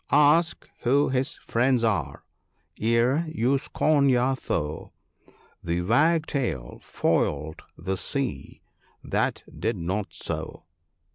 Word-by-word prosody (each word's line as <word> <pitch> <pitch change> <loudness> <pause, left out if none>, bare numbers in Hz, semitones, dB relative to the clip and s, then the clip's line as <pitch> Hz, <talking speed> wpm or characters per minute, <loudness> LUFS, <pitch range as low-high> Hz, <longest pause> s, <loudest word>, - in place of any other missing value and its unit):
— - - -46
" - - -39 0.2
Ask 165 +1 0
who 140 +4 +2
his 130 +3 0
friends 125 +1 +2
are, 110 -5 -1 0.6
ere 115 +7 +2
you 135 -2 +1
scorn 145 0 +2
your 130 +1 +3
foe; 80 - -4 0.7
The 85 +1 -1
Wagtail 135 - +1
foiled 75 +2 -1 0.2
the 95 +4 -3
sea, 135 +7 -4 0.4
that - - -1 0.2
did - - -1
not 95 +5 -2
so." 80 -1 -5
120 Hz, 115 wpm, -26 LUFS, 90-140 Hz, 0.7 s, your